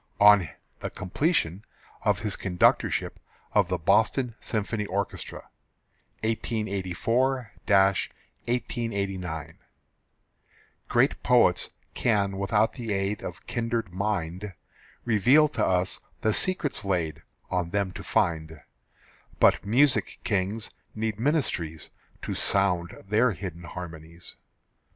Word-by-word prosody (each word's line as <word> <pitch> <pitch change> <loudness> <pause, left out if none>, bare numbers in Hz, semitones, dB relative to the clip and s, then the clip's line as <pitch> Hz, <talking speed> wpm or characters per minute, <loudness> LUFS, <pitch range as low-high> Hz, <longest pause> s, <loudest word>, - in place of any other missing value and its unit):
(On 100 -5 +7 0.3
the - - -4
completion 100 - 0 0.4
of - - +2
his 105 -2 -1
conductorship 90 -2 +1 0.4
of 105 -4 +4
the 90 0 -1
Boston 115 - +2
Symphony 105 -1 -2
Orchestra.) 100 -2 -3 0.8
1884 110 +3 -1 0.2
1889. 100 - -1 1.3
Great - - +2
poets - - +4 0.2
can 100 -4 +1
without 105 +2 +2
the 120 -5 -5
aid 100 +1 -1
Of 85 -1 -7
kindred 115 -5 -2
mind 95 -1 -2 0.5
Reveal 125 +7 +5
to - - -1
us 90 -1 +1 0.2
the 110 - +2
secrets 180 - +2
laid 90 -5 -1 0.3
On 90 -2 0
them 100 0 0
to - - -8
find; 80 -2 0 0.8
But - - +5
music 130 +6 +3
kings 105 +1 -1 0.2
need 110 -1 -2
ministries 110 - -1 0.3
To - - -2
sound 95 -2 0
their 110 +3 +3
hidden 90 -2 -7
harmonies. 85 -1 -8
100 Hz, 100 wpm, -27 LUFS, 90-115 Hz, 1.3 s, On